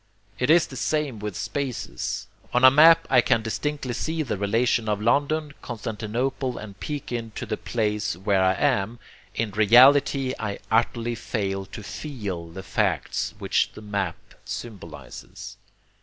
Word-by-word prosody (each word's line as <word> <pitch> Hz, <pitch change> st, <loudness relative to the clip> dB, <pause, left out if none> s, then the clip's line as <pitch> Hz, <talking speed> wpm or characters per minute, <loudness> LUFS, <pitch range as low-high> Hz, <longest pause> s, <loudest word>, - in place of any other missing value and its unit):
It 125 Hz, -, 0 dB
is 165 Hz, +1 st, +6 dB
the 135 Hz, -, -11 dB
same 145 Hz, -3 st, -1 dB
with 105 Hz, -2 st, -5 dB
spaces. 120 Hz, -, -3 dB, 0.3 s
On 125 Hz, -, +3 dB
a 130 Hz, -, +10 dB
map 165 Hz, +4 st, +7 dB
I 125 Hz, -2 st, +5 dB
can 115 Hz, -2 st, +2 dB
distinctly 135 Hz, +3 st, -3 dB
see 160 Hz, +5 st, -2 dB
the 120 Hz, -, -2 dB
relation 115 Hz, +3 st, +1 dB
of 105 Hz, -1 st, 0 dB
London, 145 Hz, +6 st, +1 dB
Constantinople, 120 Hz, +4 st, -3 dB
and 100 Hz, -2 st, -9 dB
Pekin 120 Hz, -6 st, -5 dB
to -, -, -4 dB
the -, -, -2 dB
place 105 Hz, -4 st, -2 dB
where 95 Hz, +1 st, +1 dB
I 95 Hz, 0 st, +3 dB
am; 120 Hz, -5 st, +1 dB, 0.4 s
in 115 Hz, -2 st, -1 dB
reality 130 Hz, +5 st, +5 dB
I 105 Hz, -2 st, -3 dB
utterly 115 Hz, +1 st, +1 dB
fail 95 Hz, -4 st, -3 dB
to 110 Hz, -, -9 dB
FEEL 100 Hz, -, -5 dB
the 90 Hz, +3 st, -9 dB
facts -, -, -1 dB
which -, -, 0 dB
the 110 Hz, -, -11 dB
map 100 Hz, -5 st, -2 dB, 0.3 s
symbolizes. 85 Hz, -, -8 dB
115 Hz, 145 wpm, -25 LUFS, 100-135 Hz, 0.4 s, a